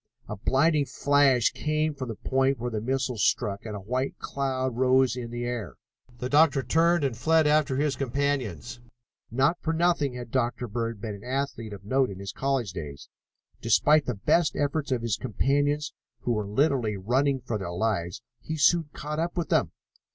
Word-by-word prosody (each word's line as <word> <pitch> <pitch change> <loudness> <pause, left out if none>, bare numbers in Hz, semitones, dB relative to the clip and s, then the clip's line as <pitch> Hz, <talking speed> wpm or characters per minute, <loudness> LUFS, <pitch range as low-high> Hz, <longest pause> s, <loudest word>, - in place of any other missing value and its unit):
A 105 - -5
blinding 140 +7 +2
flash 140 -4 +3
came 155 0 -1
from 135 -3 -6
the 115 - -4
point 135 +4 +1
where 120 +1 -4
the 110 -2 -2
missile 130 0 -1
struck 100 +1 0
and 105 - -5
a - - -5
white 125 +7 -2
cloud 130 -2 -2
rose 130 0 +3
in 120 -2 -5
the 120 +1 -4
air. 110 - -4 0.4
The 125 - -3
doctor 145 -1 +4
turned 170 +2 +3
and 135 -4 0
fled 160 +6 +3
after 150 -2 +3
his 145 +1 0
companions. 130 - -2 0.5
Not 135 +8 +1
for 160 - -1
nothing 160 -6 +1
had 120 -2 -7
Dr. 120 -1 -1
Bird 115 0 -3
been 110 -2 -4
an 100 0 -11
athlete 130 -4 -3
of 100 -1 -10
note 130 +3 +2
in 95 - -7
his 100 0 -6
college 135 -8 -1
days. 75 -5 -8 0.5
Despite 145 +7 +4
the 125 - -1
best 150 - +2
efforts 145 0 -1
of 120 -3 0
his 115 -2 0
companions, 145 +4 0 0.3
who 120 - -1
were 105 -3 -1
literally 120 -2 +1
running 130 +7 +1
for 120 -3 -4
their 95 - -5
lives, 90 -2 -2 0.2
he 160 - -5
soon 160 +1 +3
caught 150 +1 -5
up 170 +2 -2
with 170 - -2
them. - - +2
130 Hz, 185 wpm, -27 LUFS, 115-145 Hz, 0.5 s, doctor